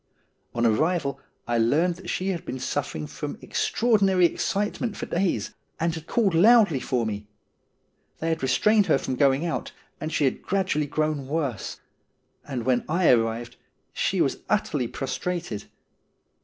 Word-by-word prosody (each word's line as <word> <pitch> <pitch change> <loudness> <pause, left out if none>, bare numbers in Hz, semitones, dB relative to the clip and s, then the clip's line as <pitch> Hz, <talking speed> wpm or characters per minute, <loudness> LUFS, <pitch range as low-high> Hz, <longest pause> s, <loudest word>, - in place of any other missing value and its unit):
On 120 0 +1
arrival, 140 +3 +1 0.3
I 120 -1 +1
learned 155 +10 +3
that 190 - -9
she 185 +1 -1
had 175 -3 -2
been 130 - -5
suffering 75 -10 -3
from - - -6
ex - - -1
traordinary 200 -6 +3
excitement 210 +5 -1
for - - -4
days, 180 +1 -1 0.3
and 165 0 +1
had 160 0 -7
called 210 -6 +2
loudly 200 - +6
for 125 -2 -1
me. 105 -1 -4 0.9
They 165 - -2
had 160 0 -1
restrained 210 +10 +3
her - - +4
from 130 - -3
going 140 +4 +3
out, 170 - -3 0.3
and 155 - -4
she 150 - +1
had 130 - 0
gradually 185 -6 0
grown 150 -2 -1
worse; 140 -7 -3 0.7
and 125 -5 -4
when 125 -1 +2
I 170 0 +4
arrived 115 0 0 0.4
she - - 0
was - - +1
utterly 125 - +1
prostrated. 135 - -4
155 Hz, 155 wpm, -25 LUFS, 125-180 Hz, 0.9 s, loudly